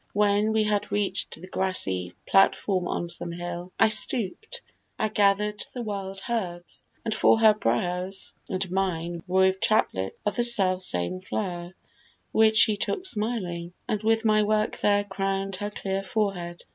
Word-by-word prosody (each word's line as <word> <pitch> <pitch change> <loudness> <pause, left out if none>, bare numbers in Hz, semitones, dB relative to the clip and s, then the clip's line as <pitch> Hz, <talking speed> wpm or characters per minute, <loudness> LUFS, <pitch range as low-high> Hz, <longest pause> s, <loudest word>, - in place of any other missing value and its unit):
When 205 +1 +2
we 220 0 +2
had 210 -1 -1
reach'd 205 -1 -1
The 185 - -10
grassy 95 - -1
platform 195 -1 +2
on 175 - -2
some 170 0 -3
hill, 175 +1 -6
I - - +6
stoop'd, 240 - +1 0.4
I 215 - 0
gather'd 210 +1 +1
the 245 - -4
wild 195 -2 -5
herbs, 180 -7 -4 0.2
and 225 - -1
for 220 +1 +4
her 220 -1 +7
brows 180 - -2 0.2
And 185 -1 -3
mine 175 -3 -2
wove 190 +1 +3
chaplets 95 - 0
of 210 - -1
the 240 - +2
self 190 -6 +3
same 90 - -1
flower, 180 -2 -4 0.6
Which 220 0 +4
she 215 -1 +6
took 205 - -2
smiling, 205 - -2
and 210 - -1
with 225 +1 +1
my 215 -1 +4
work 215 0 0
there 205 0 +3
Crown'd 195 -1 -2
her 205 +1 -3
clear 195 -2 -3
forehead. 195 -5 -3
195 Hz, 155 wpm, -26 LUFS, 180-215 Hz, 0.6 s, her